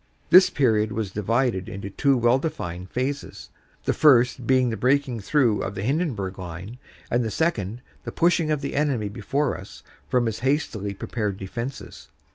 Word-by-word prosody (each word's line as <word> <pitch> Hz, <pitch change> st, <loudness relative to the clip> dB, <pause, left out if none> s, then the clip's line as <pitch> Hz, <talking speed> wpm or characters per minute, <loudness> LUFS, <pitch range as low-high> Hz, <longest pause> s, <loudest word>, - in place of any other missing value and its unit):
This 185 Hz, +1 st, +8 dB
period 110 Hz, -6 st, +2 dB
was 105 Hz, -3 st, -3 dB
divided 105 Hz, -1 st, 0 dB
into 100 Hz, +1 st, -6 dB
two 140 Hz, +5 st, +2 dB
well 120 Hz, +2 st, +3 dB
defined 90 Hz, -, -5 dB
phases, 135 Hz, +5 st, -4 dB, 0.3 s
the -, -, +2 dB
first 125 Hz, -4 st, +4 dB
being 130 Hz, -2 st, +3 dB
the -, -, -2 dB
breaking 130 Hz, -1 st, +1 dB
through 115 Hz, 0 st, +2 dB
of 95 Hz, -, -4 dB
the 95 Hz, -, -4 dB
Hindenburg 120 Hz, -, -1 dB
Line, 90 Hz, +7 st, -8 dB, 0.3 s
and 120 Hz, +1 st, +2 dB
the 110 Hz, -, -2 dB
second 120 Hz, -, -1 dB, 0.2 s
the -, -, -5 dB
pushing 170 Hz, -2 st, +2 dB
of 150 Hz, -2 st, 0 dB
the 140 Hz, -, -4 dB
enemy 135 Hz, -8 st, 0 dB
before 125 Hz, +7 st, -1 dB
us 95 Hz, -, -11 dB, 0.3 s
from 125 Hz, -1 st, +2 dB
his 110 Hz, -2 st, -2 dB
hastily 120 Hz, -7 st, -1 dB
prepared 105 Hz, -1 st, -3 dB
defenses. 115 Hz, +7 st, -7 dB
120 Hz, 165 wpm, -24 LUFS, 100-140 Hz, 0.3 s, This